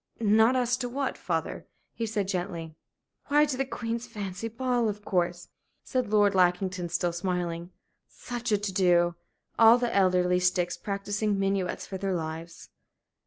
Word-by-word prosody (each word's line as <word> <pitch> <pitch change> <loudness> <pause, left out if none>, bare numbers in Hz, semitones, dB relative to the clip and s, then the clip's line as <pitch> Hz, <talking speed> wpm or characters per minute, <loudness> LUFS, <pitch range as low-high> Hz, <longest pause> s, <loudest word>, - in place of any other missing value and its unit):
"Not 220 +3 +4
asked 250 0 +1
to 245 - -2
what, 270 +2 -2
father?" - - -3 0.3
he 230 - -3
said, 205 -3 -1
gently. 175 -4 -4 0.5
"Why, 295 +1 +5
to 290 -3 -2
the 270 +1 -1
Queen's 235 -1 -4
fancy 205 -2 -5
ball, 240 0 0
of 205 0 -6
course," 175 -2 -1 0.3
said 255 -4 -1
Lord 205 -1 +4
Lackington, 180 -1 +1
still 175 0 0
smiling. 175 -1 -2 0.4
"Such 240 -1 -5
a 210 - +4
to 200 -1 -4
do! 175 -2 +3 0.5
All 225 +1 +8
the 245 -1 -1
elderly 180 -2 +3
sticks 180 -1 +1
practising 205 +1 -2
minuets 195 -1 -1
for 190 - -6
their 195 -1 -1
lives!" 160 0 -6
200 Hz, 155 wpm, -28 LUFS, 180-230 Hz, 0.5 s, All